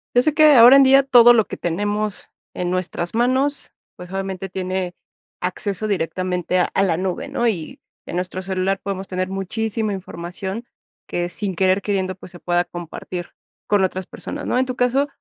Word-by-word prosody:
Yo 245 - +6
sé 310 +3 +6
que, 305 -1 +6
ahora 240 +2 +9
en 275 - +8
día 270 +1 +6
todo 245 -3 +7
lo 220 -4 +3
que - - -6
tenemos 205 +4 -2 0.2
en 180 -1 -3
nuestras 180 0 -2
manos, 260 +4 +2 0.2
pues 180 0 -11
obviamente 195 0 -4
tiene 185 -1 -3 0.5
acceso 195 +3 -3
directamente 185 -1 -1
a 180 - +1
la 170 -4 +1
nube, 185 +8 -3
¿no? 255 -4 0
Y 180 -8 -3 0.3
en 175 - -5
nuestro 185 +1 -3
celular 190 +1 -1
podemos 195 -1 -4
tener 185 0 -3
muchísima 215 +3 -2
información 190 +4 -6 0.4
que, 175 0 -2
sin 195 0 -4
querer 190 +2 +2
queriendo, 190 -2 -1
pues 185 0 -13
se 175 - -11
pueda 175 0 +1
compartir 175 +1 -7 0.4
con 205 -2 +3
otras 185 0 -4
personas, - - -7
¿no? - - 0
En 260 - +2
tu 255 -1 -4
caso, 255 +3 +1
190 Hz, 180 wpm, -21 LUFS, 180-225 Hz, 0.5 s, ahora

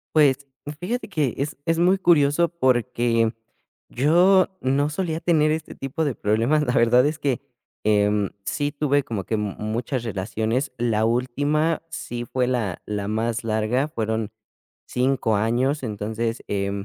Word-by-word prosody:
Pues, 140 -2 +4 0.4
fíjate 235 +7 -3
que, 155 - -1
es 145 +2 -2
es 165 0 +1
muy 185 +3 +4
curioso 170 -2 +3
porque, 120 -6 +1 0.6
yo 175 +8 +4
no 140 +3 +1
solía 160 0 -2
tener 155 -3 +3
este 160 +1 -4
tipo 135 +4 -3
de 135 - -1
problemas, 115 +9 +1
la 125 - 0
verdad 125 +3 +4
es 155 +1 0
que, 140 -4 -1 0.4
em, 105 -1 +2 0.2
sí 145 0 -1
tuve 145 -1 +1
como 110 -8 -4
que 110 - -1
m 105 -2 -3
muchas 115 +4 -2
relaciones, 110 +5 -2
la 110 -2 +1
última, 145 +7 0
sí 120 -6 -5
fue 125 +1 -1
la 115 -8 -1
la 100 -1 -3
más 115 +2 -1
larga 110 +6 0
fueron 110 -3 -2 0.6
5 125 -3 +1
años, 125 +7 +1
entonces, 110 +2 -3
eh, 100 -1 -1
125 Hz, 145 wpm, -23 LUFS, 110-150 Hz, 0.6 s, Pues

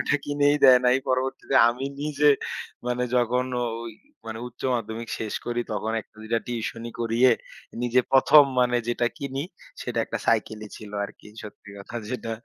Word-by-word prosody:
ঐটা 130 - +1
কিনেই 145 0 +2
দেয় 130 -1 +9
নাই। 125 - +5
পরবর্তীতে 130 +1 -1
আমি 125 +3 -3 0.2
নিজে 150 0 0 0.6
মানে 125 0 0
যখন 125 +1 +2 0.2
ঐ - - 0 0.6
মানে 110 0 -5
উচ্চ 120 - -16
মাধ্যমিক 115 0 -4
শেষ 110 -2 -4
করি, 120 0 -1
তখন 110 +1 -2
একটা - - -21
২ 110 - -10
টা 115 - +4
টিউশনি 115 0 -4
করিয়ে 120 +2 +4 0.5
নিজে 125 +1 +3
১ম 145 +3 +8 0.2
মানে 125 0 +3
যেটা 120 0 +1
কিনি 140 0 -3 0.4
সেটা - - -3
একটা - - -4
সাইকেলি 110 -1 0
ছিল 105 -2 -10
আরকি। - - -12 0.2
সত্যি 105 0 -12
কথা 100 +4 -8
যেটা 115 -2 -4
120 Hz, 165 wpm, -25 LUFS, 115-130 Hz, 0.6 s, দেয়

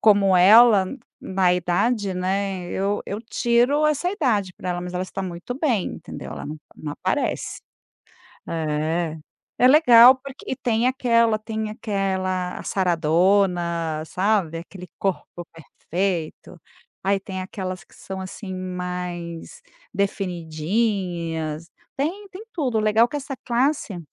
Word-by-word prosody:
como 200 -3 +5
ela, 210 +3 +7
n 275 - -7 0.2
na 185 -2 +2
idade, 190 +4 0
né, 190 0 -1
eu 200 +2 -1
eu 205 +2 -4
tiro 240 +6 +2
essa 305 +4 +1
idade 220 - 0
pra 180 - -5
ela, 175 0 -2
mas 180 0 -6
ela 180 +1 -2
está 195 - -5
muito 180 +6 -5
bem, 250 - +1
entendeu, - - -8
ela - - -7
não 150 +2 -6 0.2
não 150 -1 -6
aparece. - - -2 0.9
É. 160 +1 -1 0.4
É 250 - +7
legal 255 -4 +8
porque 270 0 -11
e 260 - -2
tem 240 -2 0
aquela 230 -4 +3
tem 220 0 -4
aquela 190 -4 -2
a - - -8
saradona, 170 -2 +1
sabe, 185 -4 0
aquele 180 +2 -10
corpo 180 -2 -3
perfeito. 170 +1 -4 0.4
Aí, 195 +1 +2
tem 190 -1 -6
aquelas 185 -1 -5
que - - -23
são, 190 0 -7
assim, 190 +1 -7
mais 180 -2 -5 0.3
definidinhas. 170 -3 -2 0.3
Tem 370 +9 -3
tem 390 +3 -10
tudo. 255 -9 0
O - - +2
legal 215 +2 +4
que 290 - -4
essa 275 -1 -5
classe 240 - 0
195 Hz, 135 wpm, -23 LUFS, 175-230 Hz, 0.9 s, legal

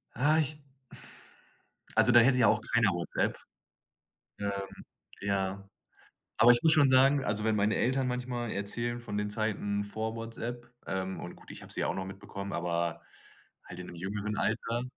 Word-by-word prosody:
Ah, 150 +6 +3
ich 155 -1 0 1.4
Also, - - +5
da 120 - +8
hätte 125 +2 +5
ja 125 - +5
auch 110 - +3
keiner 115 -4 +4
WhatsApp. 85 -1 -1 1.0
Ähm, 100 0 -1 0.7
ja. 100 -1 -1 0.7
Aber 115 +2 +7
ich 120 - +1
muss 160 - +6
schon 145 -4 +6
sagen, 135 +1 +5
also, 105 +1 -1
wenn 110 -1 +2
meine 105 +1 +2
Eltern 130 +1 +1
manchmal 125 -1 -3
erzählen 120 +4 -3
von 105 -4 -5
den 105 0 -1
Zeiten 105 -1 -1
vor 110 +2 -3
WhatsApp, 120 +1 -6 0.2
ähm, 95 0 -3
und - - -8
gut, - - -17
ich - - -9
habe - - -10
sie - - -3
ja - - +1
auch - - -1
noch 95 - -3
mitbekommen, 100 +1 -7
aber 85 -1 -2 0.6
halt 90 - -10
in 90 - -7
'nem 85 - -10
jüngeren 100 +4 -3
Alter, 115 +3 -1
110 Hz, 170 wpm, -30 LUFS, 100-120 Hz, 1.4 s, da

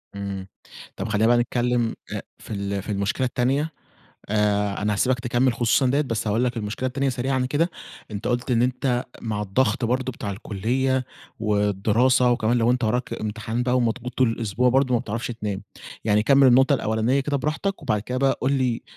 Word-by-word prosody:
إمم، 100 -1 -5 0.5
طب - - -4
خلّينا 105 +1 +2
بقى 120 0 +5
نتكلّم 120 -1 0 0.2
أ - - -2 0.2
في - - -12
ال 100 -1 -2
في 105 - -6
المشكلة 100 +6 0
التانية. 135 +6 0 0.6
آآ، 105 -1 +1
أنا 105 0 +1
هاسيبك 125 +5 +1
تكمل 120 +1 +1
خصوصًا 120 +3 +2
ديَّة، 140 +3 +2
بس 115 -7 -2
هاقول 110 +4 +1
لك 125 -1 -1
المشكلة 110 +4 -3
التانية 135 +2 0
سريعًا 130 +1 0
كده، 165 +5 +1 0.4
أنت 105 0 -5
قلت 120 +1 -1
إن 120 -1 +3
أنت 125 0 0 0.2
مع 105 -2 -2
الضغط 115 +5 +1
برضو 130 +2 0
بتاع 105 -3 -5
الكلية 125 +6 -1 0.4
والدراسة 105 +4 +2
وكمان 120 0 +2
لو 115 +1 +3
أنت 125 -1 +1
وراك 120 +3 -1
امتحان 110 +2 -3
بقى 125 0 +1
ومضغوط 125 +1 -1
طول 130 - +4
الأسبوع 115 +2 0
برضو 130 0 +3
ما - - +4
بتعرفش 115 -1 -4
تنام. 105 -4 -4 0.4
يعني 105 -1 +3
كمّل 135 +3 +5
النقطة 135 +3 +5
الأولانية 110 +3 +1
كده 140 +1 -1
براحتك 160 +7 -2
وبعد 110 -8 0
كده 125 +3 -3
بقى 135 0 +2
قل 135 +2 +2
لي 130 -4 0
120 Hz, 185 wpm, -24 LUFS, 105-130 Hz, 0.6 s, بقى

